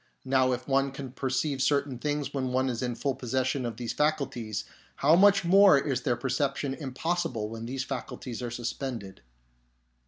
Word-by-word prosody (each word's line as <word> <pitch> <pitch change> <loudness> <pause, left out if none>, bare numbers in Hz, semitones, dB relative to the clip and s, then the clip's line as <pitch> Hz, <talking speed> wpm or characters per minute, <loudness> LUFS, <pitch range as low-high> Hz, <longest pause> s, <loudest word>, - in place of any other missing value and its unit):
Now, 130 -1 +3
if 125 0 -3
one 135 0 +2
can 135 -2 -7
perceive 135 +1 -1
certain 140 -2 +1
things 145 0 -2
when 135 -2 -1
one 130 +1 +1
is 120 -1 -3
in 125 -2 -2
full 140 +2 -1
possession 130 +1 -1
of 115 -2 -6
these 120 -2 -3
faculties, 130 -8 -1 0.3
how 150 +4 +4
much 200 0 +5
more 195 -2 +7
is 135 -2 -1
their 125 -1 +1
perception 135 +2 -1
impossible 135 -5 -2
when 115 +1 -6
these 130 +1 -3
faculties 130 -2 -6
are 120 - -3
suspended." 120 -3 -5
130 Hz, 165 wpm, -28 LUFS, 125-140 Hz, 0.3 s, more